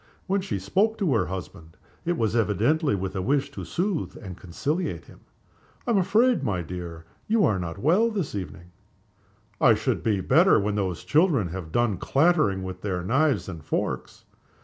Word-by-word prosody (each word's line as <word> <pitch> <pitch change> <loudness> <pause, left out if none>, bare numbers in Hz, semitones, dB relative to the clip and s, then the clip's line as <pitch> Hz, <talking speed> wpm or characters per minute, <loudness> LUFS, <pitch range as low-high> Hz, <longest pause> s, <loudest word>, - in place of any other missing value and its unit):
When 195 +1 0
she 185 - -3
spoke 200 - +1
to 185 -10 +1
her 115 - +1
husband 90 -3 -8 0.3
it 175 0 0
was 110 -1 0
evidently 115 - +2
with 95 0 -4
a 95 - -1
wish 140 +6 0
to - - -7
soothe 180 -2 -2
and 95 -5 -8
conciliate 145 - -3
him. - - -16 0.7
"I 240 - 0
am 210 - +4
afraid, 225 - +3
my 95 -9 -1
dear, 85 -1 -7 0.2
you 220 -2 +3
are 100 -3 +1
not 85 0 -5
well 180 - +3
this 195 -9 -3
evening?" 90 -3 -7 0.9
"I - - +6
shall - - 0
be 105 -3 -1
better 165 - +5
when 105 +1 -1
those 95 -4 -2
children 145 - +2
have 85 -2 -6
done 120 -1 +1
clattering 140 - +2
with 95 -1 -6
their 90 -4 -2
knives 135 - +1
and 85 -5 -7
forks." - - -3
110 Hz, 175 wpm, -25 LUFS, -, 0.9 s, I